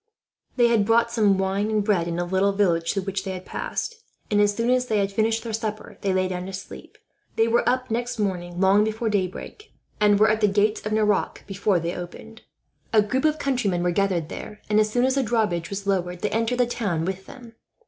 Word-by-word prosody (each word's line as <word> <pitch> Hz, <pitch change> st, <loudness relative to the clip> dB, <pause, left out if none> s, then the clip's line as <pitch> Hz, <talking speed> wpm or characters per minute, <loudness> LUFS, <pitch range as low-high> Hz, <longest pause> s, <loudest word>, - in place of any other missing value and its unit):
They 240 Hz, -, +4 dB
had 215 Hz, -3 st, +2 dB
bought 230 Hz, +1 st, +3 dB
some 210 Hz, -4 st, +3 dB
wine 195 Hz, +2 st, 0 dB
and 215 Hz, -1 st, +1 dB
bread 195 Hz, -5 st, +1 dB
in 170 Hz, 0 st, -3 dB
a 175 Hz, -, -1 dB
little 190 Hz, +2 st, +1 dB
village 170 Hz, -5 st, +1 dB
through 195 Hz, -, -2 dB
which 195 Hz, 0 st, -3 dB
they 190 Hz, -1 st, -4 dB
had 185 Hz, 0 st, -8 dB
passed 470 Hz, -1 st, -4 dB, 0.3 s
and, 205 Hz, 0 st, +4 dB
as 205 Hz, 0 st, +2 dB
soon 235 Hz, +2 st, +1 dB
as 250 Hz, 0 st, +2 dB
they 220 Hz, -, +1 dB
had 200 Hz, -1 st, 0 dB
finished 225 Hz, +2 st, 0 dB
their 230 Hz, -2 st, -5 dB
supper, 215 Hz, -1 st, -5 dB
they 195 Hz, -, 0 dB
lay 185 Hz, 0 st, +1 dB
down 180 Hz, 0 st, -4 dB
to 195 Hz, -, -7 dB
sleep. 190 Hz, -, -9 dB, 0.4 s
They 225 Hz, -, +3 dB
were 235 Hz, +1 st, +3 dB
up 255 Hz, -1 st, -1 dB
next 240 Hz, +2 st, -2 dB
morning 175 Hz, -4 st, -3 dB
long 195 Hz, +2 st, +5 dB
before 220 Hz, +1 st, -1 dB
daybreak, 205 Hz, -, -4 dB, 0.3 s
and 205 Hz, -1 st, +4 dB
were 215 Hz, 0 st, +5 dB
at 220 Hz, 0 st, -1 dB
the 210 Hz, -, +5 dB
gates 205 Hz, +2 st, +1 dB
of -, -, -4 dB
Nerac 210 Hz, -2 st, +1 dB
before 195 Hz, -1 st, 0 dB
they 170 Hz, +1 st, -3 dB
opened. 220 Hz, +5 st, -9 dB, 0.5 s
A 215 Hz, -2 st, +5 dB
group 255 Hz, +7 st, -1 dB
of 310 Hz, 0 st, +2 dB
countrymen 230 Hz, -, 0 dB
were 180 Hz, -, +1 dB
gathered 175 Hz, -4 st, 0 dB
there 210 Hz, -, -8 dB
and, 210 Hz, -, +4 dB
as 215 Hz, 0 st, +3 dB
soon 245 Hz, +3 st, +2 dB
as 260 Hz, -, +2 dB
the 275 Hz, -, +2 dB
drawbridge 210 Hz, -8 st, 0 dB
was 200 Hz, 0 st, -5 dB
lowered, 180 Hz, -3 st, -1 dB
they 210 Hz, -, -1 dB
entered 230 Hz, +2 st, 0 dB
the 250 Hz, -, +3 dB
town 200 Hz, -9 st, -2 dB
with 190 Hz, +1 st, -4 dB
them. 240 Hz, -3 st, -12 dB
205 Hz, 230 wpm, -24 LUFS, 190-225 Hz, 0.5 s, long